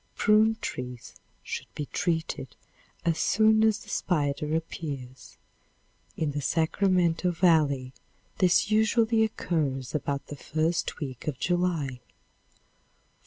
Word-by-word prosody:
Prune 220 +1 +4
trees 125 -1 -6 0.3
should - - -6
be 150 - -3
treated 160 -5 -2 0.5
as 165 -1 +1
soon 220 +2 +4
as 220 -1 +2
the - - -14
spider 150 -2 0
appears. 140 -6 -6 0.8
In 155 -2 0
the 145 +1 -3
Sacramento 175 +2 +1
valley 155 -7 +2 0.5
this 185 +2 +3
usually 220 +1 +3
occurs 145 - -2
about 140 -2 -2
the 145 - -8
first 155 +4 -1
week 130 -3 -6
of 145 -4 -2
July. 170 -8 0
160 Hz, 110 wpm, -27 LUFS, 140-185 Hz, 0.8 s, Prune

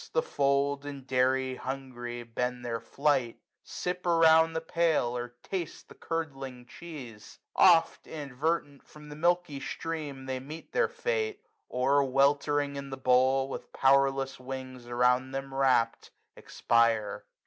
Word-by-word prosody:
The 485 - +2
fold, 140 - +1
and 140 -2 -8
dairy, 130 0 +1
hungry, 120 -3 -6
bend 125 +1 -3
their 115 -1 -2
flight; 135 0 0 0.3
Sip 180 0 -4
round 165 -1 +5
the - - +1
pail, 160 -7 +1
or 120 0 -5
taste 180 -4 -5
the - - -12
curdling 135 -6 -5
cheese: 125 -8 -10 0.2
Oft, 165 - +5
inadvertent, 145 0 -3
from 150 0 -15
the 145 - -8
milky 175 -2 +1
stream 150 -3 -5
They 130 -1 -3
meet 150 +5 -10
their 475 -2 +2
fate; 470 -2 -2 0.2
or, 135 +3 +2
weltering 140 +1 +2
in 140 0 -6
the 135 - -6
bowl, 130 +1 +3
265 - - -10 0.2
"With - - -15
powerless 135 0 +3
wings 130 -1 -7
around 125 +2 +2
them 135 0 -5
wrapt, 130 -4 +2 0.3
expire. 115 -3 +1
135 Hz, 135 wpm, -29 LUFS, 125-155 Hz, 0.3 s, round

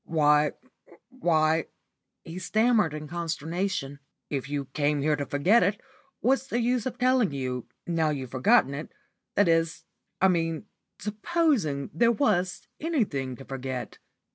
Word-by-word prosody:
"Why 150 -2 +3 0.6
why," 160 - +2 0.6
he 165 +3 -7
stammered 215 -3 +2
in 155 0 -6
consternation. 165 -2 -3 0.3
"If 135 -2 -3
you 145 -1 -2
came 145 0 +1
here 150 0 +3
to 145 -1 -4
forget 185 +12 +4
it, 200 +3 +1 0.4
what's 265 +2 +2
the 240 - -1
use 245 0 +1
of 250 - -5
telling 250 - +3
you, 130 -3 -3 0.2
now 165 -2 +1
you've 135 -5 -4
forgotten 130 +1 +4
it, 150 +3 -6 0.4
that 205 - +4
is 165 0 +1 0.3
I 190 - +5
mean, 165 -1 0 0.3
supposing 210 - 0
there 230 +9 +4
was 190 -8 0
anything 195 - -1
to 135 - -12
forget." 130 -1 -5
165 Hz, 140 wpm, -27 LUFS, 145-215 Hz, 0.6 s, I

